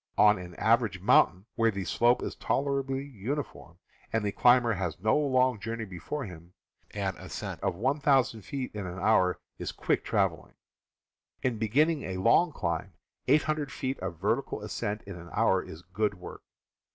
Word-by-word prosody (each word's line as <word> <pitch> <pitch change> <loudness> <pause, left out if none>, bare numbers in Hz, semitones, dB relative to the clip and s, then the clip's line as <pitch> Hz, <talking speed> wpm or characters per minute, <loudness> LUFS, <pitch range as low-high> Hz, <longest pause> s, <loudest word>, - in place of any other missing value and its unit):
On 105 -2 +6
an 90 -1 -9
average 110 -4 +2
mountain, 95 0 +4
where 115 -1 +2
the 100 -3 -3
slope 120 +1 +2
is - - -3
tolerably 135 -1 -1
uni 140 +3 -3
form, 85 -8 -16 0.3
and 110 -2 0
the 100 - 0
climber 120 +1 +4
has 90 -5 -3
no 110 +3 +2
long 130 -5 +2
journey 115 +1 -4
before 95 - -5
him, 85 -2 -11 0.4
an 95 -2 -1
ascent - - -6
of 95 - -1
1,000 135 - +2
ft. 130 +5 -5
in 100 -3 -5
an 90 +1 -6
hour 95 -2 +3 0.2
is - - -3
quick - - -1
walking. - - 0 0.9
In 125 -4 0
beginning 145 +8 +2
a 95 -5 -4
long 165 - +4
climb, 85 - -3 0.3
800 150 +1 +2
ft. 130 0 -3
of 90 -2 -5
vertical - - -1
ascent 105 +1 -3
in 100 -2 -8
an 85 0 -11
hour 100 -4 +3
is 80 +2 -11
good 100 +3 -1
work. 90 - -10
110 Hz, 165 wpm, -29 LUFS, 95-130 Hz, 0.9 s, On